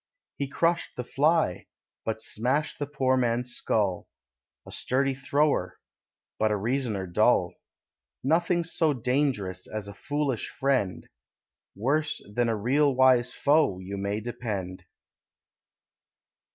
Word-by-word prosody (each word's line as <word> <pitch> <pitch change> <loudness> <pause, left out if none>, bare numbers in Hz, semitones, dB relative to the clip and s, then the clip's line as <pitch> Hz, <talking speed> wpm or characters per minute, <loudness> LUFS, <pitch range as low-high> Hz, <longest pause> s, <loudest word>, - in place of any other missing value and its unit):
He 140 - -1
crushed 165 +4 0
the 125 - -4
fly, 145 - +1 0.4
but 110 0 -3
smashed 130 +7 -1
the 145 - -2
poor 135 -3 +1
man's 125 0 0
skull 100 -7 0 0.6
A - - -9
sturdy 135 +1 0
thrower, 140 -6 0 0.6
but 110 - +3
a 105 - +1
reasoner 110 -3 -1
dull. 85 -1 +2 0.7
Nothing's 170 +3 +1
so 160 -3 +3
dangerous 125 -8 -1
as 110 -2 -5
a 100 - -8
foolish 145 +1 -2
friend; 130 -9 -1 0.7
Worse 145 +9 0
than 120 +1 +1
a 115 - +1
real 135 +6 +2
wise 130 -1 +5
foe, 145 -10 +2
you 95 +2 -6
may 100 +1 -2
depend. 100 -6 -5
125 Hz, 120 wpm, -27 LUFS, 105-145 Hz, 0.7 s, wise